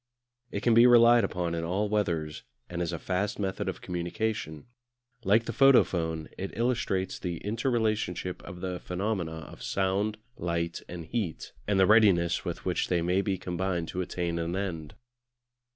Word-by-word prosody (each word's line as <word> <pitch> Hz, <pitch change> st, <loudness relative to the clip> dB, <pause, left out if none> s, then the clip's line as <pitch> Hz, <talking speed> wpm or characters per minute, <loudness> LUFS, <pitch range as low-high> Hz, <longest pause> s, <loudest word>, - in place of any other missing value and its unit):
It -, -, -4 dB
can 120 Hz, -, +4 dB
be 115 Hz, +2 st, +8 dB
relied 120 Hz, -1 st, +7 dB
upon 90 Hz, -3 st, -2 dB
in 85 Hz, 0 st, -2 dB
all 95 Hz, +5 st, 0 dB
weathers, 85 Hz, -8 st, -1 dB, 0.3 s
and 90 Hz, 0 st, -4 dB
is 85 Hz, -1 st, -1 dB
a 85 Hz, -, -3 dB
fast 95 Hz, +5 st, -2 dB
method 95 Hz, -2 st, -2 dB
of -, -, -6 dB
communication. 85 Hz, -2 st, -3 dB, 0.6 s
Like 110 Hz, +4 st, +3 dB
the 115 Hz, -, -4 dB
photophone 85 Hz, -, +3 dB
it 95 Hz, -, -5 dB
illustrates 115 Hz, -6 st, 0 dB
the 85 Hz, -3 st, -4 dB
inter 115 Hz, +5 st, -1 dB
relationship 105 Hz, -7 st, -1 dB
of 90 Hz, -2 st, -9 dB
the 90 Hz, -1 st, -3 dB
phenomena 90 Hz, -4 st, -3 dB
of -, -, -13 dB
Sound, 100 Hz, +3 st, 0 dB, 0.2 s
Light, 85 Hz, 0 st, -2 dB
and 85 Hz, -2 st, -7 dB
Heat, 100 Hz, -5 st, -3 dB, 0.2 s
and 100 Hz, -2 st, +2 dB
the 95 Hz, -, +6 dB
readiness 95 Hz, -6 st, +4 dB
with -, -, -5 dB
which -, -, 0 dB
they 85 Hz, -2 st, +1 dB
may 90 Hz, +3 st, +2 dB
be 100 Hz, -1 st, -1 dB
combined 90 Hz, -1 st, -2 dB
to 90 Hz, -, -2 dB
attain 85 Hz, -1 st, -2 dB
an 85 Hz, +2 st, -2 dB
end. 85 Hz, -6 st, -4 dB
95 Hz, 170 wpm, -28 LUFS, 85-105 Hz, 0.6 s, be